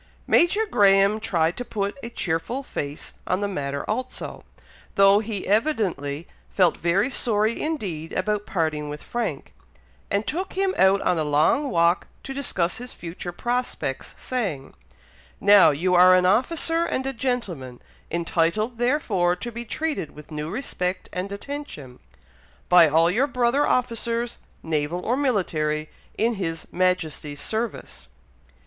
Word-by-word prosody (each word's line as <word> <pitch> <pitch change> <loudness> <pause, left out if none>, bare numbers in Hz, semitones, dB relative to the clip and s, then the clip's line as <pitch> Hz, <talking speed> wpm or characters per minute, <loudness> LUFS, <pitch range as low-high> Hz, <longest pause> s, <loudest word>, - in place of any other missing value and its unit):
Major 410 +6 +3
Graham 200 - +4
tried 175 -7 +1
to 245 - -2
put 200 -4 -3
a 235 - -6
cheerful 195 +6 -2
face 145 - -6
on 185 - +1
the 205 - -1
matter 140 -7 -4
also, 250 +4 -4 0.5
though 195 +1 +6
he 215 -2 -4
evidently 190 - 0 0.2
felt 180 -4 +3
very 190 - +1
sorry 220 -2 +1
indeed 185 - -3
about 210 +2 -1
parting 155 -6 -1
with 150 0 -7
Frank, 220 -13 -4 0.6
and 200 +2 0
took 370 +4 -3
him 385 0 +1
out 190 +1 +4
a 175 -3 +2
long 155 - +2
walk 170 -2 +2 0.2
to 270 - -6
discuss 190 -11 -1
his 245 +1 -8
future 175 +1 -7
prospects, 240 - -3
saying, 195 - -3 0.7
"Now 205 -2 +7
you 170 +5 0
are 180 +1 +7
an 180 0 +3
officer 325 - +2
and 265 -5 -2
a 270 - -2
gentleman, 195 - -3 0.3
entitled 170 +7 0
therefore 220 -9 +1
to 240 +6 -6
be 235 +1 -6
treated 305 - -3
with 150 +1 -13
new 150 0 -4
respect 185 -4 -3
and 185 +2 -3
attention, 200 - -7 0.7
by 175 -2 +8
all 165 +3 +4
your 250 +9 +2
brother 250 +1 +1
officers, 235 -1 -1 0.2
naval 160 +2 -2
or 240 - +2
military, 155 - 0 0.3
in 230 +2 +2
his 165 -2 -3
Majesty's 165 -5 -1
service." 220 - -4
195 Hz, 140 wpm, -24 LUFS, 165-240 Hz, 0.7 s, by